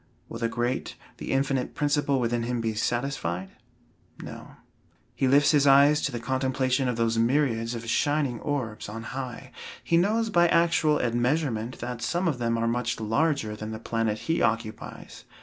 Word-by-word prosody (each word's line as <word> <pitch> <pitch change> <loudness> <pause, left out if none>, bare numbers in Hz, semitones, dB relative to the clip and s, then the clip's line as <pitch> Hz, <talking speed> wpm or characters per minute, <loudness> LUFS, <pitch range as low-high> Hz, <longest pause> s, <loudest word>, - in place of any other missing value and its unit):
Will - - -7
the 115 - 0
great, 120 +2 -2 0.2
the - - -5
infinite 135 -1 0
principle 145 -2 +1
within 120 -1 0
him 120 +1 -2
be 115 -1 -1
satisfied? 110 -6 -2 0.7
No. - - -10 0.6
He 135 - 0
lifts 145 +2 +5
his 145 -2 +4
eyes 140 +2 +6
to 140 - -1
the 120 - -4
contemplation 130 +1 0
of 125 - 0
those 115 0 +1
myriads 115 -2 +1
of 115 0 -7
shining 145 -1 +1
orbs 125 -9 -3
on 115 +2 -6
high. 130 0 -6 0.3
He 170 - +2
knows 220 +5 +1
by 175 -2 +5
actual 165 -3 +3
admeasurement 120 0 0
that 120 -1 -5
some 175 +9 0
of 145 -7 -1
them 115 -1 0
are 115 0 0
much 115 0 -1
larger 110 0 0
than 110 0 -6
the 110 - -5
planet 115 -1 -1
he 165 +1 0
occupies. 110 -1 -3
125 Hz, 165 wpm, -26 LUFS, 115-145 Hz, 0.7 s, eyes